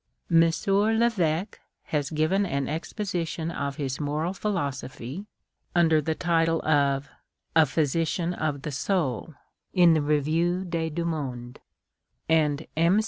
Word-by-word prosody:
M. 165 0 +7
Leveque 195 0 +1 0.2
has 145 -2 -2
given 160 +6 +1
an 140 -8 -1
exposition 165 0 -3
of 140 -3 -3
his 135 -2 -3
moral 150 +4 -1
philosophy, 145 - -4 0.5
under 165 -3 +4
the 160 +2 -1
title 165 -1 +2
of 140 -2 +2 0.2
" - - -48
A 160 -2 +6
Physician 165 +4 0
of 150 -5 -2
the 150 - -3
Soul," 150 - -1 0.4
in 175 -2 +7
tlie 155 -2 +2
Revue 165 +5 +1
des 165 -2 -2
Deux 170 +2 -3
Mondes; 125 -7 -4 0.7
and 155 -2 +2
M. 170 +6 +4
160 Hz, 130 wpm, -26 LUFS, 145-175 Hz, 0.7 s, M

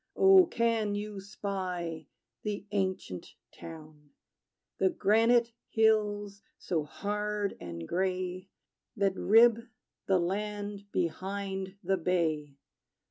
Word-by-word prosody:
Oh, 385 -2 +7
can 230 -6 +1
you 205 -1 -4
spy 185 -5 -4 0.3
the 205 -2 -4
ancient 190 - -3 0.2
town, 155 -2 -11 0.7
The 190 - +4
granite 230 +4 +3 0.2
hills 205 -2 +2 0.2
so 160 -4 -2
hard 210 +4 -2
and 85 -1 -6
gray, 185 0 -2 0.5
That 200 -1 +2
rib 230 +3 +6 0.5
the 190 - +4
land 205 +2 -3
behind 190 +2 -3
the 190 +2 +1
bay? 160 -5 0
195 Hz, 95 wpm, -30 LUFS, 180-210 Hz, 0.7 s, Oh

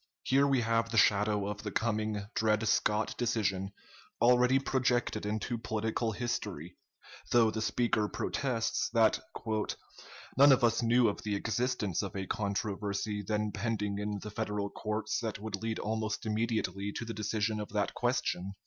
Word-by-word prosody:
Here 140 +2 +3
we 135 -3 +3
have 115 0 +1
the 115 - -2
shadow 105 0 +3
of 105 0 -4
the 105 - -4
coming 110 -1 -1
Dred 110 0 +1
Scott 105 0 +2
decision 100 -5 0 0.5
already 125 +2 +5
projected 125 -5 0
into 110 +3 -2
political 110 +1 -1
history, 105 -8 -4 0.6
though 115 -2 +5
the 110 +1 -3
speaker 115 -1 +1
protests 120 +1 -1
that 115 -2 +4 1.2
"none 140 +2 +8
of 130 - +4
us 115 0 +3
knew 120 +1 +4
of 100 - -2
the 105 -2 -2
existence 110 -3 -1
of 100 -2 -5
a 95 -1 -3
controversy 100 0 -2
then 105 +1 -1
pending 105 -1 -2
in 105 0 -2
the 105 - -6
Federal 100 -1 -2
courts 110 +1 -2
that 110 -3 -3
would 105 0 -4
lead 110 0 -2
almost 110 0 -2
immediately 110 -2 -1
to 120 - -4
the 115 - -5
decision 110 0 -1
of 105 - -5
that 105 0 -1
question." 120 -6 -1
110 Hz, 155 wpm, -31 LUFS, 105-115 Hz, 1.2 s, none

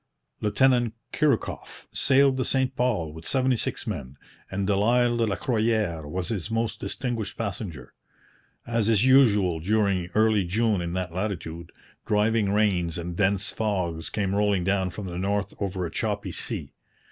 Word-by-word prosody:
Lieutenant 120 +1 +2 0.2
Chirikoff 150 -7 -1
sailed 135 -1 +4
the 130 - +1
St 130 -1 0
Paul 105 -12 0
with 80 0 -9
seventy 130 -1 +2
six 120 - -3
men, 70 - -5 0.3
and 95 0 -2
Delisle 120 +4 +3
de 115 - +2
la 100 - 0
Croyère 110 - 0
was 90 +1 -3
his 105 -3 -3
most 115 -1 -1
distinguished 115 -4 -3
passenger. 95 - -5 0.7
As 115 -2 0
is 110 +1 +4
usual 105 -10 +5
during 100 -1 +1
early 110 -2 +4
June 105 +2 +1
in 85 0 -3
that 90 -2 -3
latitude, 85 -4 -4 0.4
driving 105 -1 +2
rains 95 -6 +1
and 85 0 -5
dense 100 0 +1
fogs 90 -7 -2
came 100 -2 -1
rolling 100 -2 +2
down 95 0 +1
from 95 +3 -7
the 90 -1 -5
north 100 +1 -1
over 95 -2 -2
a 85 - -5
choppy - - -2
sea. - - -3
105 Hz, 155 wpm, -26 LUFS, 90-115 Hz, 0.7 s, usual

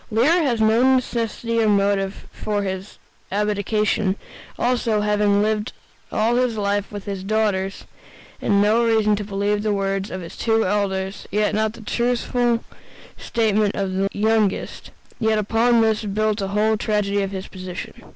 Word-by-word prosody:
Lear 280 +11 +3
has 250 -7 +1
no 230 +4 +4
necessity 230 -2 -1
or 220 - +3
motive 200 -1 +1
for 205 -1 -2
his 190 +1 -5 0.3
abdication; 210 0 0 0.4
also, 235 -3 +1
having 210 -1 +2
lived 215 0 -1 0.4
all 230 +3 +1
his 250 -3 +1
life 205 -1 -1
with 205 -1 -6
his 195 -2 -4
daughters, 200 -2 0 0.6
has - - -3
no 210 +3 +4
reason 220 -2 +3
to 210 - -3
believe 205 +1 -1
the 215 0 0
words 195 0 -1
of 185 - -5
the 170 - -8
two 225 -1 +1
elders 190 0 -1
and 210 +2 +1
not 215 0 0
the 235 - -12
truthful 240 +1 0 0.5
statement 215 -2 0
of 195 -1 -2
the 195 +1 0
youngest; 215 -1 0 0.3
yet 220 -1 +2
upon 230 +3 +3
this 220 -1 +2
is 215 - -5
built 215 +1 0
the 195 - -2
whole 215 +2 +1
tragedy 205 -1 0
of 195 - -1
his 190 -1 -6
position. 185 -1 -7
210 Hz, 160 wpm, -22 LUFS, 200-225 Hz, 0.6 s, no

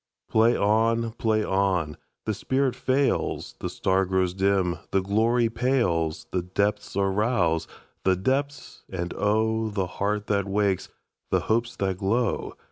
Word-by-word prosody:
Play 115 +2 +4
on! 115 +2 +2
Play 110 -1 0
on! 95 -6 0 0.3
The 110 - 0
spirit 130 +5 0
fails, 135 - 0
The - - -3
star 95 0 +1
grows 95 -1 +1
dim, 95 -2 +1
the 95 - +1
glory 115 +4 +2
pales, 115 -10 0
The 90 - 0
depths 100 +4 -1
are 100 0 +2
roused—the 95 -3 0
depths, 135 +7 -2
and 90 -2 -4
oh! 110 +2 +1
The 100 -3 -1 0.2
heart 105 +1 0
that 100 -1 0
wakes, 100 -1 0 0.4
the - - +2
hopes 115 +2 0
that 95 -2 -2
glow! 110 +4 0
100 Hz, 135 wpm, -26 LUFS, 95-115 Hz, 0.4 s, Play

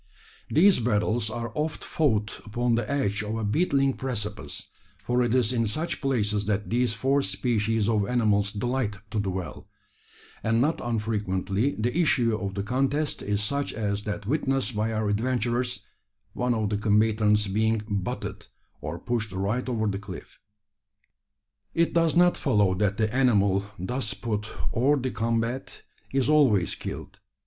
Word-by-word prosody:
These 185 +4 +5
battles 110 0 +1
are 115 +1 -4
often 155 +1 -2
fought 110 -9 0
upon 120 +2 0
the 115 -1 0
edge 120 -8 0
of 110 +1 -3
a 110 - -2
beetling 135 - +2
precipice 105 -6 -5 0.3
for 120 +4 +1
it 120 0 +2
is 125 -1 +2
in 115 -2 +1
such 155 +11 -3
places 105 -7 0
that 105 0 -1
these 120 -1 +1
four 135 +6 +2
species 115 -5 0
of 105 -3 +2
animals 105 -4 +2
delight 120 0 -1 0.2
to 110 - 0
dwell 95 -3 -4 0.7
and 115 +1 +1
not 150 +6 +1
unfrequently 105 0 -1
the 120 +5 -1
issue 125 -9 +3
of 100 -3 -4
the 100 - -2
contest 135 +7 0
is 105 0 -1
such 140 +6 -1
as 105 -2 -1
that 105 -1 -4
witnessed 135 -1 0
by 110 +2 0
our 110 -1 -1
adventurers 120 +1 0 0.5
one 125 -1 0
of 110 -2 -1
the 105 - +1
combatants 105 0 +3
being 110 +2 +1
"butted" 100 -4 -4 0.3
or 75 +3 -4
pushed 110 0 -2
right 100 +7 -1
over 110 -3 0
the 100 -2 -1
cliff. 95 -3 -10 1.4
It 170 0 +2
does 165 -1 +3
not 175 0 +5
follow 105 - +2
that 100 +1 0
the 110 0 0
animal 100 -6 +3
thus 105 +3 -2
put 105 +1 -3 0.3
hors 140 +5 +3
de 130 0 -2
combat 115 +3 -2 0.3
is 135 -1 +1
always 130 - +4
killed. - - -7
110 Hz, 155 wpm, -26 LUFS, 105-125 Hz, 1.4 s, These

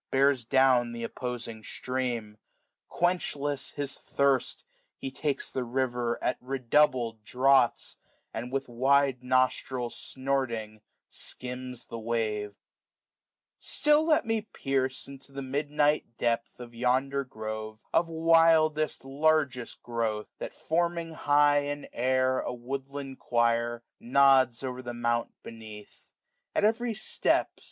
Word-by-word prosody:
Bears 135 -2 +3
downth* 125 -3 +3
opposing 115 -2 -6
stream: 120 -5 -3 0.5
quenchless 145 -5 -1
his 140 -1 -2
diirst; 140 -2 +1 0.3
He 135 - -5
takes 145 +1 -2
the 130 - -2
river 120 -1 -1
at 125 - 0
redoubled 125 -3 +1
draughts; 130 +1 +2 0.4
And 120 +3 -5
with 135 0 -2
wide 135 +1 +2
nostrik, 130 -1 +1
snorting, 120 -5 -3 0.3
skims 125 -1 -6
the 115 - -7
wave« 110 -2 -2
5^5 - - -33 1.0
Still 300 +1 +3
let 315 -5 +3
me 225 -1 0
perce 135 -10 -2
into 140 0 -11
the 140 - -5
midxiight 145 -1 0
depth 115 0 -1
Of 120 -1 -9
yonder 130 +3 +1
grove, 110 -3 -6 0.2
of 165 0 +3
wildest 160 -2 +3
largest 140 -3 0
growth: 115 -3 -2
That, - - -6
forming 170 0 -1
high 145 -1 +4
in 145 0 -4
air 130 +1 +2
a - - -3
woodland 135 +2 -6
quire. 120 0 +1 0.2
Nods 130 -1 +4
o'er 130 -1 -4
the 120 -1 -6
mount 120 0 0
beneath. 110 -2 -11 0.5
At - - +2
every 225 +2 +1
step. 215 - +1
130 Hz, 115 wpm, -28 LUFS, 120-145 Hz, 1.0 s, high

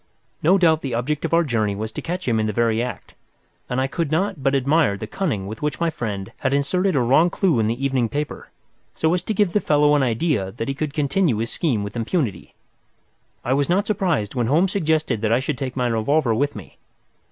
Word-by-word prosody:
No 180 +5 +4
doubt 160 -4 +3
the 130 -4 -3
object 140 +6 -2
of - - -3
our 170 - +4
journey 110 -8 0
was 110 +2 -4
to - - -6
catch 180 0 -4
him 115 -2 +2
in 110 - 0
the - - 0
very 115 0 +1
act, 125 +1 -6 0.6
and 125 - -1
I 130 - +2
could 160 +3 -2
not 180 +1 -1
but 135 +1 +2
admire 140 -5 +2
the 110 - -5
cunning 110 - -2
with 110 +2 -7
which 150 0 -2
my 170 -1 +1
friend 100 -8 -5
had 135 0 0
inserted 180 +6 +1
a - - +3
wrong 135 +8 +4
clue 175 - +1
in 110 - +2
the 120 +5 -2
evening 130 -4 +1
paper, 145 +3 -4 0.5
so 160 +1 +1
as 180 - +1
to 220 - -3
give 200 -3 +2
the 210 - +3
fellow 150 -4 +3
the - - +2
idea 115 - 0
that 115 0 -4
he 135 - -1
could 140 +1 -4
continue 150 - +1
his 115 +2 -2
scheme 125 -11 0
with 100 - -7
impunity. 115 - -2 0.9
I 130 - +1
was 140 +2 +1
not 195 +4 +2
surprised 180 - 0
when 120 -3 0
Holmes 170 +8 +2
suggested 155 - 0
that 110 -1 0
I 120 - +4
should 135 +2 -2
take 130 -2 -4
my 125 -2 0
revolver 120 +3 +1
with 140 +6 0
me. 100 -5 -11
140 Hz, 230 wpm, -22 LUFS, 115-160 Hz, 0.9 s, No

